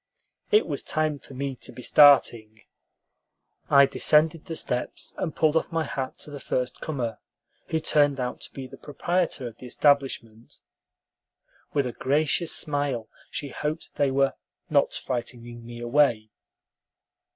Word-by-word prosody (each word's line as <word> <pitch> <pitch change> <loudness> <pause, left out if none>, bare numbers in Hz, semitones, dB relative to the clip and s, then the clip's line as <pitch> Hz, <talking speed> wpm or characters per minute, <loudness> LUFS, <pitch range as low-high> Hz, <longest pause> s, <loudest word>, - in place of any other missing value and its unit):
It 430 0 +4
was - - -3
time 155 -2 -1
for 135 - -13
me 135 0 -3
to - - -10
be 125 +1 -10
starting. 115 -8 +5 1.1
I 140 0 +7
descended 155 +3 +2
the 165 -3 -5
steps, 125 -5 -3
and 165 -5 -3
pulled 155 -1 +2
off 160 - +1
my 165 -1 0
hat 135 -3 -4
to 150 - -8
the 145 - -7
first 125 -1 -3
comer, 120 -8 -3 0.5
who 160 - 0
turned 145 -3 +2
out 125 0 -3
to - - -7
be 135 - -7
the 130 - -11
proprietor 170 -2 -1
of 115 -1 -10
the 125 - -9
establishment. 125 -5 0 1.1
With 140 -2 +1
a 125 - -2
gracious 155 +6 +1
smile, 145 -6 -1 0.2
she 145 - -4
hoped 150 +4 -4
they 140 -1 +3
were 135 0 +2 0.4
"not 145 -2 +3
frightening 120 -2 -5
me 120 0 -8
away." 120 -3 +2
140 Hz, 150 wpm, -26 LUFS, 125-150 Hz, 1.1 s, I